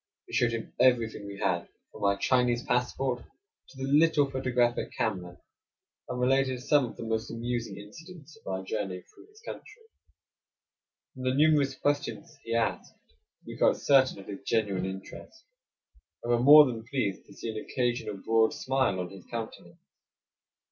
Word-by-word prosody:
We -, -, -15 dB
showed 120 Hz, -1 st, +2 dB
him 115 Hz, -1 st, -5 dB
everything 115 Hz, -5 st, +2 dB
we 100 Hz, 0 st, -8 dB
had, 85 Hz, -3 st, -1 dB, 0.2 s
from 105 Hz, -, -5 dB
our 100 Hz, 0 st, +3 dB
Chinese 125 Hz, -1 st, +2 dB
passport 125 Hz, 0 st, -1 dB, 0.5 s
to -, -, -16 dB
the 135 Hz, -, -5 dB
little 150 Hz, 0 st, +4 dB
photographic 125 Hz, -2 st, 0 dB
camera, 90 Hz, -5 st, -3 dB, 0.7 s
and 125 Hz, 0 st, -3 dB
related 130 Hz, 0 st, +2 dB
some 145 Hz, -1 st, +3 dB
of 115 Hz, -, -9 dB
the -, -, -6 dB
most 110 Hz, 0 st, -2 dB
amusing 115 Hz, -3 st, -4 dB
incidents 155 Hz, -, -12 dB
of -, -, -21 dB
our 95 Hz, 0 st, -3 dB
journey 95 Hz, -2 st, -4 dB
through -, -, -19 dB
his 420 Hz, +1 st, -20 dB
country. 460 Hz, 0 st, -10 dB, 1.3 s
From 130 Hz, -, -10 dB
the 130 Hz, 0 st, 0 dB
numerous 145 Hz, -2 st, +3 dB
questions 145 Hz, +3 st, -2 dB
he 115 Hz, 0 st, -3 dB
asked 115 Hz, -1 st, -1 dB, 0.5 s
we -, -, -8 dB
felt -, -, +3 dB
certain 135 Hz, -2 st, +4 dB
of 100 Hz, -, -11 dB
his 100 Hz, -1 st, -8 dB
genuine 100 Hz, -4 st, 0 dB
interest, 95 Hz, -, -9 dB, 0.8 s
and 120 Hz, -, -1 dB
were 120 Hz, -, +3 dB
more 145 Hz, +4 st, +9 dB
than 115 Hz, -4 st, -4 dB
pleased 120 Hz, -6 st, -3 dB
to -, -, -14 dB
see 115 Hz, -, -5 dB
an 110 Hz, 0 st, -6 dB
occasional 120 Hz, -5 st, -2 dB
broad 110 Hz, +3 st, +2 dB
smile 130 Hz, -8 st, 0 dB
on 90 Hz, 0 st, -4 dB
his 95 Hz, -2 st, -13 dB
countenance. 110 Hz, -6 st, -7 dB
120 Hz, 160 wpm, -29 LUFS, 105-135 Hz, 1.3 s, more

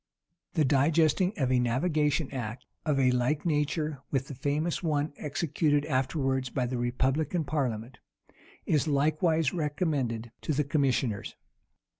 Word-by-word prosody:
The 155 Hz, -, +3 dB
digesting 155 Hz, +6 st, +3 dB
of 130 Hz, -4 st, +1 dB
a 125 Hz, -, +4 dB
navigation 145 Hz, +4 st, +1 dB
act, 120 Hz, -1 st, -5 dB, 0.2 s
of 145 Hz, -3 st, +2 dB
a 130 Hz, -1 st, +4 dB
like 125 Hz, +6 st, 0 dB
nature 150 Hz, -2 st, 0 dB
with 135 Hz, -1 st, -1 dB
the -, -, -5 dB
famous 150 Hz, +5 st, -1 dB
one 150 Hz, -3 st, 0 dB
executed 150 Hz, 0 st, 0 dB
afterwards 130 Hz, -1 st, 0 dB
by 125 Hz, 0 st, -1 dB
the 125 Hz, 0 st, -2 dB
republican 135 Hz, +7 st, 0 dB
parliament, 130 Hz, -5 st, -2 dB, 0.7 s
is 155 Hz, 0 st, +2 dB
likewise 155 Hz, +3 st, +2 dB
recommended 145 Hz, -8 st, -1 dB
to 155 Hz, -, -1 dB
the 150 Hz, +2 st, +1 dB
commissioners. 135 Hz, -7 st, 0 dB
145 Hz, 130 wpm, -29 LUFS, 130-155 Hz, 0.7 s, a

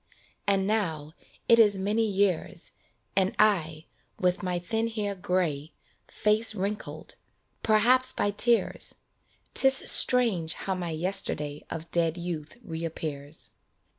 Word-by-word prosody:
And 195 Hz, -1 st, +2 dB
now 165 Hz, -8 st, -2 dB, 0.3 s
it 230 Hz, 0 st, +6 dB
is 205 Hz, -3 st, +5 dB
many 210 Hz, +4 st, 0 dB
years, 195 Hz, -3 st, -1 dB, 0.4 s
And 190 Hz, 0 st, +1 dB
I, 165 Hz, -7 st, +1 dB, 0.3 s
with 180 Hz, +1 st, +1 dB
my 180 Hz, -2 st, -2 dB
thin 225 Hz, +6 st, -2 dB
hair 210 Hz, -3 st, -3 dB
gray, 170 Hz, -5 st, -2 dB, 0.3 s
Face 215 Hz, +1 st, +2 dB
wrinkled 205 Hz, +2 st, -5 dB, 0.4 s
perhaps 245 Hz, +4 st, +4 dB
by 205 Hz, -, -1 dB
tears! 235 Hz, +3 st, +1 dB, 0.6 s
'Tis 265 Hz, 0 st, +5 dB
strange 210 Hz, -11 st, +4 dB
how 195 Hz, -, -4 dB
my 180 Hz, -2 st, -4 dB
yesterday 155 Hz, -4 st, 0 dB
Of 165 Hz, 0 st, -7 dB
dead 170 Hz, -1 st, 0 dB
youth 170 Hz, +1 st, -6 dB
reappears. 160 Hz, -4 st, -6 dB
190 Hz, 115 wpm, -27 LUFS, 165-215 Hz, 0.6 s, it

